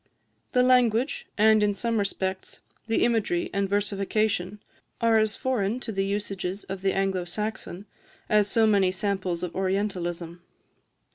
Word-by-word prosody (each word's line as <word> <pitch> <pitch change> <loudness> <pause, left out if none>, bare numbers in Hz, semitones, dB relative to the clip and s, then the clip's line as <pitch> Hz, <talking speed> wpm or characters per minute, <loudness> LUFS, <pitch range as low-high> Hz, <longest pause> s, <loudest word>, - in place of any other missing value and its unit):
The 250 -1 +4
language, 250 +1 +2
and, 215 0 +5
in 205 -1 +2
some 230 +1 0
respects, 190 -1 -3 0.3
the 225 - +2
imagery 220 -7 0
and 200 0 0
versification, 200 -1 -1 0.4
are 230 -1 +4
as 215 -1 +1
foreign 245 -3 -1
to 225 - -5
the 195 -2 -1
usages 195 -1 -3
of 190 0 -6
the 195 0 +1
Anglo 195 -2 0
Saxon 205 +1 -5 0.4
as 210 -2 +3
so 225 +2 +3
many 200 -4 +3
samples 185 -3 -2
of 180 - -4
Orientalism. 180 -3 -2
200 Hz, 140 wpm, -26 LUFS, 190-220 Hz, 0.4 s, and